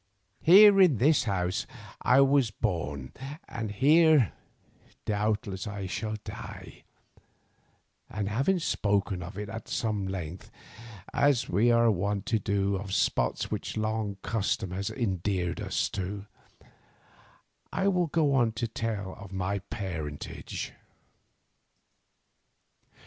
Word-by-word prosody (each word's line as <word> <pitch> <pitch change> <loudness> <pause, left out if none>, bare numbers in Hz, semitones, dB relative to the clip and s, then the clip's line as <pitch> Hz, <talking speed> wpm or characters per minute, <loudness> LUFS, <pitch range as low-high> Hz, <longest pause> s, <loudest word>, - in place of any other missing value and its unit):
Here 195 +3 +8
in 170 -10 +5
this 145 +7 +3
house 90 -3 -1 0.3
I 130 +2 +5
was 135 -3 +4
born, 85 - -3 0.4
and 115 -2 -4
here 150 - +4 0.7
doubtless 105 -2 -1
I 100 -1 -5
shall 110 +3 -3
die, - - -9 1.2
and 105 -2 -3
having 135 - +1
spoken 100 - 0
of 90 +4 -8
it 105 0 -4
at 110 +1 -7
some 105 -4 -1
length, 90 -2 -6 0.6
as 140 -4 +2
we 105 +7 +3
are 115 -1 +5
wont 100 +1 -1
to 110 - +4
do 100 0 0
of 95 0 -4
spots 60 -10 0
which - - -4
long 110 -2 -2
custom 105 -3 -1
has 95 +2 -3
endeared 95 -6 -1
to - - -4
us, - - 0 1.8
I 195 - 0
will 180 -3 +2
go 150 -2 +2
on 120 -4 +3
to 115 +1 -2
tell 110 -4 -3
of 95 -1 -10
my 95 +1 -2
parentage. 85 -7 -6
105 Hz, 115 wpm, -28 LUFS, 95-120 Hz, 1.8 s, Here